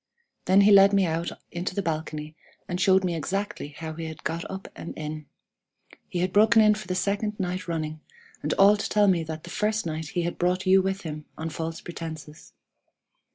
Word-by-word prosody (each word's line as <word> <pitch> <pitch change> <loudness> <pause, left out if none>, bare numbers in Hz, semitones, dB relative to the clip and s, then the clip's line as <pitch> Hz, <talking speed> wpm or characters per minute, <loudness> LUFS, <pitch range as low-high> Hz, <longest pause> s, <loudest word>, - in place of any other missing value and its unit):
Then 190 +2 +5
he 205 +1 +6
led 200 0 +7
me 195 -1 +4
out 165 0 -1 0.2
into 175 +1 -4
the 200 - -1
balcony, 155 -1 -4 0.3
and 180 +1 -3
showed 190 0 +4
me 180 -2 0
exactly 195 +1 -3
how 160 +2 -7
he 165 +1 -6
had 160 -1 -8
got 165 +1 -2
up 190 0 -6
and - - -8
in. 155 -1 -6 0.8
He 175 - -2
had 185 0 -1
broken 220 +2 +6
in 215 -1 +6
for 210 -1 -7
the 185 - -2
second 205 +3 -1
night 180 -1 -3
running, 155 -2 -3 0.4
and - - -2
all 200 +2 +6
to 205 - -3
tell 210 -1 +4
me 175 -4 +3
that 160 0 -6
the 175 - -9
first 215 +1 0
night 160 -1 -3
he 175 +3 -2
had 170 - -3
brought 180 +1 +1
you 190 +1 +6
with 190 +1 -2
him 150 -3 -6
on 160 0 -4
false 165 +1 -4
pretences. 160 -3 -8
175 Hz, 205 wpm, -26 LUFS, 160-195 Hz, 0.8 s, led